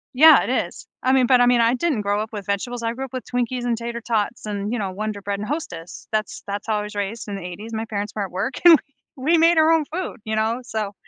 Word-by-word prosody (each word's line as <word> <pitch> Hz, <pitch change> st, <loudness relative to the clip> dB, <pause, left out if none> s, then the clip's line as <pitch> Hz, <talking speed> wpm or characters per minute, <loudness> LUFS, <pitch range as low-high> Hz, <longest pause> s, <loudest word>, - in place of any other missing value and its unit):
yeah, 315 Hz, +4 st, +8 dB
it -, -, -4 dB, 0.2 s
is. -, -, -13 dB, 0.2 s
I 260 Hz, +1 st, +2 dB
mean 255 Hz, -2 st, +4 dB
but 250 Hz, -2 st, +5 dB
I -, -, +6 dB
mean, 245 Hz, -1 st, +4 dB
I 230 Hz, +1 st, +4 dB
didn't 285 Hz, -5 st, 0 dB
grow 205 Hz, +1 st, 0 dB
up 220 Hz, -, -4 dB
with 205 Hz, -2 st, -6 dB
vegetables. 235 Hz, +4 st, -3 dB
I 230 Hz, 0 st, 0 dB
grew 265 Hz, +2 st, -4 dB
up 260 Hz, -, -14 dB
with 255 Hz, -, -4 dB
Twinkies 245 Hz, 0 st, -1 dB
and 235 Hz, -2 st, 0 dB
tater 235 Hz, 0 st, -5 dB
tots 220 Hz, -1 st, -1 dB
and, 205 Hz, 0 st, -3 dB
you 245 Hz, -, -1 dB
know, 195 Hz, -2 st, -2 dB
Wonder 210 Hz, +1 st, -4 dB
Bread 200 Hz, 0 st, -3 dB
and 210 Hz, -, -4 dB
Hostess. 180 Hz, -, -6 dB
That's 215 Hz, -1 st, -2 dB
that's 200 Hz, +2 st, -4 dB
how 215 Hz, -1 st, +1 dB
I 210 Hz, -, -3 dB
was 210 Hz, 0 st, -8 dB
raised 205 Hz, +3 st, -3 dB
in 205 Hz, -, -4 dB
the 195 Hz, -, -6 dB
80s. 205 Hz, +6 st, -7 dB
My 220 Hz, 0 st, -2 dB
parents 205 Hz, -2 st, -4 dB
were 205 Hz, -, -1 dB
at 190 Hz, -, -10 dB
work 245 Hz, +8 st, -2 dB
and 345 Hz, -, +11 dB, 0.4 s
we 260 Hz, -, -9 dB
we -, -, +6 dB
made 330 Hz, +1 st, +5 dB
our 315 Hz, +1 st, +5 dB
own 320 Hz, -2 st, +3 dB
food, 360 Hz, -6 st, -3 dB
you 220 Hz, 0 st, -2 dB
know, 225 Hz, +3 st, 0 dB
so 215 Hz, -4 st, -3 dB
225 Hz, 285 wpm, -22 LUFS, 205-250 Hz, 0.4 s, and